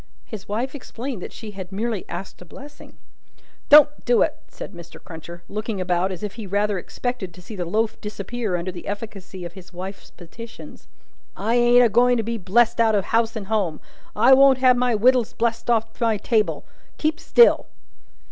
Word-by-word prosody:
His 215 -4 -9
wife 240 +6 -2
explained 255 -5 -6
that - - -7
she 220 -2 -9
had 190 -2 -9
merely 215 0 -3
"asked 180 +2 -7
a - - -8
blessing." 285 - -13 0.7
"Don't 295 0 +7
do 245 -1 +4
it!" - - -1
said - - -10
Mr. 170 -1 -12
Crunches 170 +1 -10
looking 215 -1 -4
about, 180 +1 0
as 185 +2 -7
if 205 -1 -4
he 205 - -7
rather 205 0 0
expected 210 -3 -5
to - - -13
see 195 +4 -10
the 180 -3 -3
loaf 220 +5 -1
disappear 210 0 -4
under 175 +2 -3
the 175 -1 -10
efficacy 200 -3 -7
of 170 - -8
his 190 -1 -13
wife's 190 +2 -8
petitions. 225 +7 -12 0.5
"I 220 +4 -1
ain't 240 0 +5
a - - +6
going 245 +3 +4
to 225 - -1
be 230 +1 -3
blest 230 +5 +2
out 220 -2 +3
of 200 - 0
house 230 0 +2
and 215 -3 -5
home. 195 -7 -1 0.4
I 240 +5 +6
won't 270 0 +6
have 255 -1 +5
my 245 -1 +1
wittles 245 +1 +3
blest 235 0 -2
off 225 0 0
my 225 -2 +2
table. 215 +1 0 0.3
Keep 315 +1 -1
still!" 475 - +5
220 Hz, 190 wpm, -22 LUFS, 190-240 Hz, 0.7 s, Don't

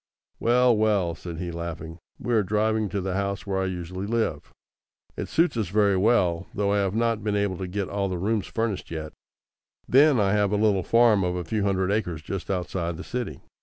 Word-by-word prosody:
"Well, 120 0 +4
well," 105 -5 +2
said 85 0 -8
he, 85 0 -4
laughing, 85 -1 -6 0.2
"we 120 - -2
are 110 - +4
driving 105 +1 0
to 100 - -2
the 95 0 -2
house 100 0 -2
where 95 -1 -1
I - - 0
usually 90 +1 -5
live. 115 +1 -1 0.6
It - - -4
suits 170 -2 +2
us 110 -4 0
very 100 +1 +3
well, 95 -4 +2
though 100 -1 +1
I 105 - +2
have 100 0 0
not 115 -2 0
been 105 -1 0
able 100 -3 0
to 95 - -3
get 95 +1 -3
all 100 -1 -1
the 90 - -2
rooms 105 +3 -1
furnished 115 -3 -2
yet. 80 -2 -6 0.7
Then 140 0 +5
I 100 -2 +2
have 105 -1 +2
a - - +2
little 105 -2 +3
farm 115 0 +4
of 90 0 -1
a 90 - -3
few 105 +6 -1
hundred 95 -1 +1
acres 90 -7 -2
just 95 -2 -5
outside 90 -2 -2
the - - -7
city. 120 - -5
100 Hz, 210 wpm, -25 LUFS, 90-110 Hz, 0.7 s, Then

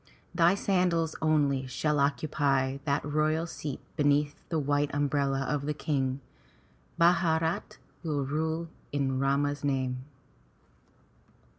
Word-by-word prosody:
Thy 175 +2 +4
sandals 180 -5 +1
only 145 -4 +2
shall 150 +3 0
occupy 140 -2 +1
that 140 -1 0
royal 155 +2 +1
seat 150 -4 -5 0.2
beneath 145 -1 +2 0.2
the 165 - 0
white 145 0 +1
umbrella 140 -1 +1
of 145 -1 -1
the 150 - -1
King. 135 -3 -1 0.8
Bharat 165 -1 +2 0.2
will 150 -4 -1
rule 160 +3 -1 0.2
in 135 -2 0
Rama's 140 +1 +1
name. 130 -2 -1
145 Hz, 110 wpm, -29 LUFS, 140-160 Hz, 0.8 s, Thy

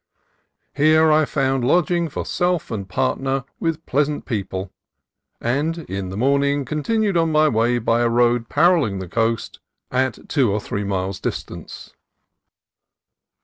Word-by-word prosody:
Here 155 +2 +4
I 155 0 +4
found 135 -2 0
lodging 170 +4 +2
for - - -5
self 175 -5 -1
and 100 -4 -4
partner 135 +5 -1 0.2
with 165 -1 -2
pleasant 145 +2 0
people, 95 -5 -4 0.7
and 145 +8 -1
in 95 -1 -4
the 95 - -6
morning 140 +3 +1
continued 200 - 0
on 165 -1 +2
my 155 0 +4
way 120 -1 +2
by 115 0 +1
a 120 - +2
road 120 0 +2
paralleling 165 - +3
the 95 -1 -6
coast 115 +4 -1 0.3
at 130 -2 -1
two 130 -8 +2
or 105 - 0
three 100 0 -4
miles' 95 -1 -2
distance. - - -6
130 Hz, 140 wpm, -21 LUFS, 115-155 Hz, 0.7 s, Here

